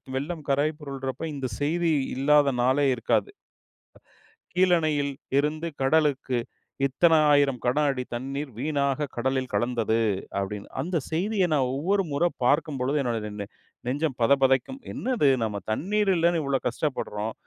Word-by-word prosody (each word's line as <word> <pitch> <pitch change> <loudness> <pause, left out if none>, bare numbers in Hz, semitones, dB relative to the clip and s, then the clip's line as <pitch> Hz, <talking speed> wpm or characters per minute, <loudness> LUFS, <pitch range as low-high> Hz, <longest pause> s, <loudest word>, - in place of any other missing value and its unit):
வெள்ளம் 155 +4 -3
கரை 140 +2 +3
புரல்றப்ப 135 -2 -5
இந்த 135 -2 -3
செய்தி 165 +3 +1 0.2
இல்லாத 145 +1 +4
நாளே 135 +3 +3
இருக்காது. 120 - 0 1.2
கீழணையில் 160 -6 +2 0.3
இருந்து 155 +3 0
கடலுக்கு 135 -3 +2 0.5
இத்தன 165 +5 +3 0.2
1,000 140 -4 +3
கன 125 +4 +1
அடி 130 -2 -2
தண்ணீர் 135 +2 -4
வீணாக 140 0 0
கடலில் 130 +1 -1
கலந்தது 115 +1 +1 0.4
அப்டின்னு, 100 +1 -5
அந்த 175 0 -1
செய்தியை 185 +3 +1
நான் 130 -4 +2
ஒவ்வொரு 195 +7 +1
முற 140 - +1 0.2
பார்க்கும் 145 0 +2
பொழுது 140 +4 0
என்னுடைய 105 -4 -3 0.4
நெஞ்சம் 140 +1 -1
பதபதக்கும். 135 - +3
என்னது 245 - +1 0.2
நம்ம 105 -2 -2
தண்ணீர் 200 - +1
இல்லன்னு 170 -1 +2
இவ்வளோ 135 -1 0
கஷ்டப்படுறோம். 115 -5 -3
140 Hz, 125 wpm, -26 LUFS, 130-160 Hz, 1.2 s, இல்லாத